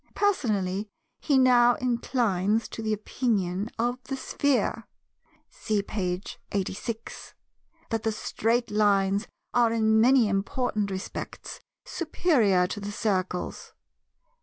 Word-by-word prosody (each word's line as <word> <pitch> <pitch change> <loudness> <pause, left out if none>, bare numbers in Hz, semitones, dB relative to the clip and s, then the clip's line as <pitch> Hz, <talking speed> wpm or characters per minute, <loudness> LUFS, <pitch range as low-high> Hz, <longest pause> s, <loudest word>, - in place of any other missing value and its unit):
Personally, 210 - 0 0.3
he 285 -3 +2
now 245 -2 +5
inclines 230 -4 0
to - - -6
the 220 -1 -1
opinion 210 -3 -1
of 245 +2 -1
the 270 - -4
Sphere 280 0 0 0.6
(see 210 -2 -2
page 185 -2 -4
86) 210 +4 -4 0.6
that 225 -1 0
the 225 0 0
Straight 230 +2 -1
Lines 200 -1 +2 0.3
are 240 -2 +4
in 220 -1 +3
many 250 -1 +5
important 210 +1 -1
respects 190 +1 -6 0.3
superior 250 - +2
to 195 - -4
the 205 0 -5
Circles. 185 -4 -2
220 Hz, 110 wpm, -27 LUFS, 200-245 Hz, 0.6 s, now